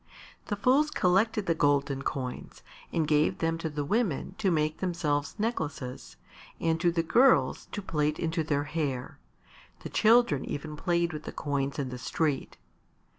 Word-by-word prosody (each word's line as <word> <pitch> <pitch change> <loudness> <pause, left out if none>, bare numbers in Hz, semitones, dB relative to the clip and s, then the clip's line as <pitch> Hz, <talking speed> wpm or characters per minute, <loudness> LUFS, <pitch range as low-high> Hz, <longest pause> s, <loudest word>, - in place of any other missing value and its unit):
The 205 - -1
fools 260 +9 +3
collected 205 +1 +2
the 170 - +2
golden 140 -3 +1
coins 130 -2 -5 0.3
and 160 -2 0
gave 150 0 +2
them 165 0 -1
to 165 - -3
the 145 -1 -3
women 195 - 0
to 195 - +2
make 155 -2 0
themselves 155 -6 -1
necklaces 155 - -4 0.4
and 165 0 0
to 175 -1 +3
the 165 -1 0
girls 250 +10 +3
to 205 - -5
plait 150 -3 0
into 165 -1 -1
their 145 -2 0
hair; 145 -5 -3 0.6
the - - -6
children 220 - +4
even 150 +1 -5
played 170 +1 0
with 155 0 -7
the - - -5
coins 140 -1 -2
in 140 -3 -2
the 125 0 -7
street. 150 0 -2
160 Hz, 160 wpm, -29 LUFS, 145-180 Hz, 0.6 s, children